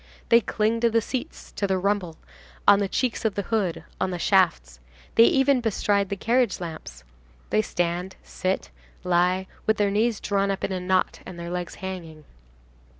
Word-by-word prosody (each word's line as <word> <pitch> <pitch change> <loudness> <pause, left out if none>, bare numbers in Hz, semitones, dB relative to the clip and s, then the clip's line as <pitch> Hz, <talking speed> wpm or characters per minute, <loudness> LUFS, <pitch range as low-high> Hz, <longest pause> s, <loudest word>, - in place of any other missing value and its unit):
They 235 0 +6
cling 220 +1 0
to 235 0 +3
the 230 0 +3
seats, 255 +6 -5
to 200 - -2
the 190 -1 +1
rumble, 185 -3 -1 0.5
on 205 0 +7
the 200 - 0
cheeks 250 +4 -1
of 220 -3 0
the 200 - -1
hood, 200 -7 -1 0.2
on 190 - 0
the 180 - -3
shafts. 60 - +2 0.3
They 230 - +7
even 270 0 +3
bestride 205 -3 +1
the 200 - -2
carriage 235 +2 +1
lamps. 165 -3 -8 0.5
They 215 - +4
stand, 175 -1 -2
sit, 185 +1 -3 0.3
lie, 180 +1 +2 0.2
with 220 - +3
their 205 -1 +2
knees 220 +1 +1
drawn 200 -1 0
up 195 - -2
in - - -1
a 185 - -2
knot, 185 +1 0
and 180 - -9
their 170 0 -6
legs 180 -1 -4
hanging. 165 -5 -7
195 Hz, 180 wpm, -25 LUFS, 180-220 Hz, 0.5 s, on